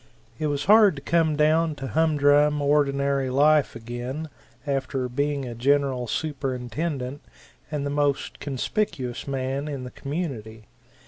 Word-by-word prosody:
It 155 - 0
was 145 -1 -2
hard 210 -3 +6
to 140 - -8
come 165 -2 +2
down 155 +1 +2
to 135 - -6
humdrum 150 -2 +3
ordinary 140 -2 +1
life 145 +2 +3
again 120 +7 -5 0.4
after 135 -2 -1
being 140 +2 -1
a 120 - -5
General 130 0 +1
Superintendent 135 0 -3 0.5
and 145 -2 -3
the 140 - -2
most 145 -1 -1
conspicuous 135 - -3
man 135 +1 -2
in 140 -3 -5
the 125 - -7
community. 125 -8 -5
140 Hz, 130 wpm, -25 LUFS, 130-150 Hz, 0.5 s, hard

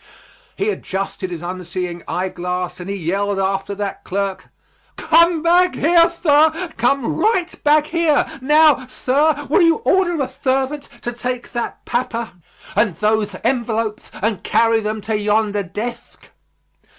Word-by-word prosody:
He 415 +2 0
adjusted 190 - -4
his 175 -2 -6
unseeing 180 -1 -5
eye 185 +1 -2
glass 180 0 -4
and 180 +2 -7
he 200 - -2
yelled 195 +3 -1
after 195 +1 -1
that 200 -1 -4
clerk: 195 0 -3 0.5
"Come 330 0 +4
back 355 +2 +4
here, 335 +2 +4
thir, 320 +1 +2
come 245 +2 +1
right 375 -5 0
back 300 0 +4
here. 320 -2 +2 0.2
Now, 300 -1 +4
thir, 290 +4 +1
will 315 +8 +3
you 330 -1 +5
order 350 -3 +2
a 270 - +1
thervant 270 +3 -2
to 240 - -3
take 250 +1 -4
that 240 -2 -5
papah 235 -2 -2 0.5
and 210 -3 +2
thothe 210 -2 0
envelopes 225 -4 -1
and 215 -4 0
carry 230 -1 +3
them 215 0 -3
to 220 +1 -2
yondah 210 -1 0
dethk." 235 +3 -7
235 Hz, 140 wpm, -19 LUFS, 200-305 Hz, 0.5 s, you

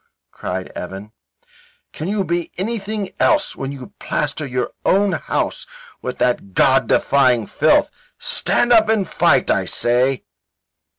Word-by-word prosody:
cried 95 0 -5
Evan. 95 +4 -8 0.8
"Can 155 - -5
you 200 0 0
be 170 -1 -2
anything 210 0 -3
else 305 -2 +2
when 135 0 -5
you 135 -3 -10
plaster 150 0 -2
your 125 -1 -2
own 200 +1 +3
house - - -2 0.3
with 125 - -5
that 120 -6 -1
God - - +4
defying 125 -5 +3
filth? - - +2 0.3
Stand 240 0 +2
up 220 -2 +5
and 210 -4 +1
fight, - - +2
I - - +1
say." 125 +2 +1
145 Hz, 130 wpm, -19 LUFS, 125-205 Hz, 0.8 s, up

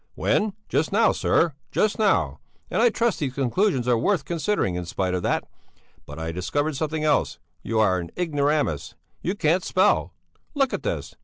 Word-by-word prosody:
"When? 210 -1 +1
Just 155 - 0
now, 220 +2 +4
sir! 165 -2 +2 0.2
just 215 0 +1
now! 210 -3 +2 0.3
And - - +1
I 240 - +6
trust 230 -1 0
these 135 -4 -2
conclusions 135 - +1
are 120 -2 +3
worth 190 - +1
considering, 170 - 0
in 90 0 -3
spite 90 +1 -1
of 90 - -1
that. - - 0 0.6
But 75 - -9
I 80 0 -3
discovered 145 - -1
something 155 +2 -2
else; 150 -2 +1 0.2
you 115 -1 -1
are 95 -4 +3
an 85 -1 -6
ignoramus; 145 - 0 0.3
you 185 - -2
can't 175 0 +2
spell! - - +2 0.4
Look 275 -2 +1
at - - -2
this! - - -3
150 Hz, 175 wpm, -24 LUFS, -, 0.6 s, I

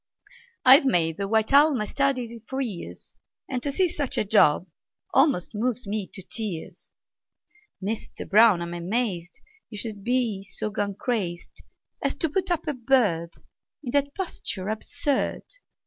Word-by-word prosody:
I've 265 +4 +9
made 165 -10 +2
the 200 - -2
white 220 +4 +1
owl 290 +1 +6
my 215 - -1
study 250 -2 -1
for 265 - -4
years, 220 -10 -6 0.3
And 255 -2 -3
to 285 - -1
see 365 +6 +2
such 290 -5 -3
a - - +2
job 190 -5 +4 0.5
almost 270 - +3
moves 240 +2 -1
me 200 -1 -3
to 190 - -6
tears! 200 -6 -5 0.9
Mister 210 +3 -5
Brown, 210 -4 +5
I'm 170 0 -6
amazed 180 -1 -2 0.3
You 210 - -8
should 205 -2 -5
be 235 -4 0
so 205 +2 -4
gone 200 0 -2
crazed 190 -7 -3 0.4
As 275 - 0
to 325 +2 -1
put 375 +4 -1
up 345 -3 0
a 300 - -1
bird 225 -10 +1 0.5
In 245 - -4
that 285 +1 +1
posture 210 - -4
absurd! 280 +5 -1
225 Hz, 150 wpm, -25 LUFS, 195-270 Hz, 0.9 s, I've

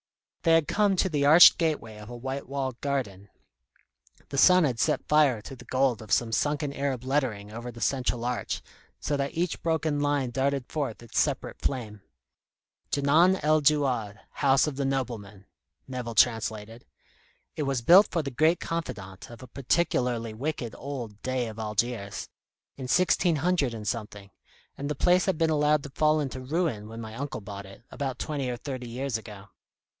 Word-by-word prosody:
They 165 - +3
had 165 -3 +4
come 205 -2 +2
to 190 +1 +1
the 145 -3 +1
arched 165 +4 +9
gateway 150 -10 -1
of 105 +1 -11
a 120 - -7
white 130 +2 -5
walled 135 -3 -3
garden. 105 -9 -3 1.0
The 140 - -1
sun 185 +2 +7
had 125 -6 0
set - - 0
fire 150 -6 +4
to 135 - -9
the 125 0 -14
gold 130 -3 +1
of 110 -3 -11
some 115 +4 +2
sunken 145 +3 0
Arab 135 -3 -2
lettering 130 -7 -1
over 120 +2 -7
the 120 - -12
central 125 -3 0
arch, 125 0 -3 0.4
so 145 - -1
that 140 0 -3
each 170 +1 -1
broken 160 -2 0
line 145 -3 0
darted 135 +1 0
forth 135 -7 -4
its 115 - -2
separate - - -1
flame. 110 -6 -3 0.9
"Djenan 160 +7 +4
el 155 0 +3
Djouad; 130 -8 +1
House 135 -1 +3
of 150 -3 -3
the 140 - -1
Nobleman," 110 -7 -4 0.4
Nevill 125 -3 -5
translated. 110 0 +1 0.7
"It - - -3
was 135 -4 -1
built 185 - +8
for 165 -3 -1
the 140 - -4
great 155 +7 +3
confidant 100 - -5
of 120 +2 -11
a - - -10
particularly 125 -4 0
wicked 125 -1 -4
old 120 -7 -7
Dey 130 -2 -1
of 110 0 -8
Algiers, 105 -1 -2 0.5
in 130 -2 -7
sixteen 175 +3 +3
hundred 150 -5 0
and 105 -2 -7
something, 105 -4 -5 0.4
and 140 +1 -5
the 150 - -2
place 180 +5 +3
had 190 -4 0
been 160 0 +2
allowed 150 -1 +2
to 140 - -9
fall 155 +2 +2
into 135 -3 -4
ruin 135 -6 -2
when 115 +1 -8
my 110 -1 -8
uncle 135 -1 -5
bought 100 -1 -8
it, 95 +4 -14
about 135 -3 -4
twenty 140 -4 -3
or 120 - -3
thirty 125 -1 -6
years 130 +1 -3
ago. 105 -3 -12
130 Hz, 180 wpm, -27 LUFS, 115-150 Hz, 1.0 s, arched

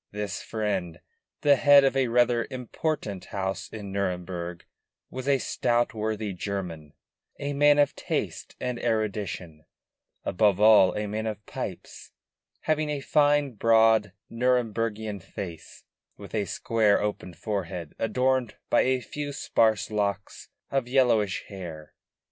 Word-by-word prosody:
This 105 -2 -4
friend, 100 -7 -3 0.4
the 145 -1 +5
head 145 0 +7
of 135 0 +2
a 135 -2 +2
rather 120 0 +2
important 125 - -3
house 95 0 -4
in 105 -3 -7
Nuremburg, 90 -3 -3 0.5
was 130 +1 -6
a 140 -1 +4
stout 120 -1 0
worthy 110 -2 -2
German, 90 -5 -5 0.4
a 145 0 -3
man 145 +1 +5
of 145 -1 +3
taste - - -4
and 125 -1 -3
erudition, 100 -8 -2 0.6
above 100 +1 +2
all 105 -3 +6
a 105 - -1
man 110 +2 -3
of 105 -1 -5
pipes, - - -7 0.5
having 155 -1 0
a 145 -1 -1
fine, 145 0 +3
broad, 110 -2 +4 0.2
Nuremburgian 115 -4 -1
face, 85 -1 -8 0.3
with - - -11
a 105 -2 0
square 105 +2 +2
open 100 -4 -3
forehead 90 -6 -4
adorned 125 +1 +1 0.2
by - - +5
a 130 0 +1
few 145 +3 -5
sparse 110 -6 +1
locks 100 -2 -2 0.2
of 135 -3 0
yellowish 120 -6 +2
hair. 85 -6 -9
110 Hz, 130 wpm, -27 LUFS, 100-125 Hz, 0.6 s, head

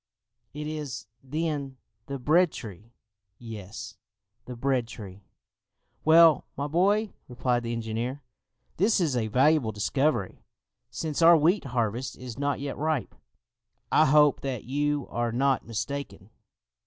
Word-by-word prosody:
"It 150 0 -5
is, 150 -6 -5 0.2
then, 145 -1 -3 0.3
the 140 0 -4
bread 160 +6 +3
tree?" 110 0 -10 0.5
"Yes, 110 -4 -9 0.5
the 125 - -7
bread 125 -1 0
tree." 100 -4 -11 0.8
"Well, 160 -1 +6
my 140 - -2
boy," 200 +7 +2
replied 125 -1 0
the 120 0 -4
engineer, 115 +4 -3 0.5
"this 210 +4 +3
is 160 -7 +1
a 115 -3 0
valuable 130 +1 +3
discovery, 110 +1 -1 0.5
since 155 -1 -3
our 165 0 +8
wheat 170 +5 +2
harvest 120 -1 -2
is 125 0 -8
not 145 0 0
yet 140 0 -5
ripe; 155 -3 -1 0.8
I 155 - +5
hope 150 0 +5
that 130 -4 -4
you 145 +1 -1
are 120 0 -1
not 130 +1 +1
mistaken!" 110 -3 -5
135 Hz, 130 wpm, -27 LUFS, 115-150 Hz, 0.8 s, our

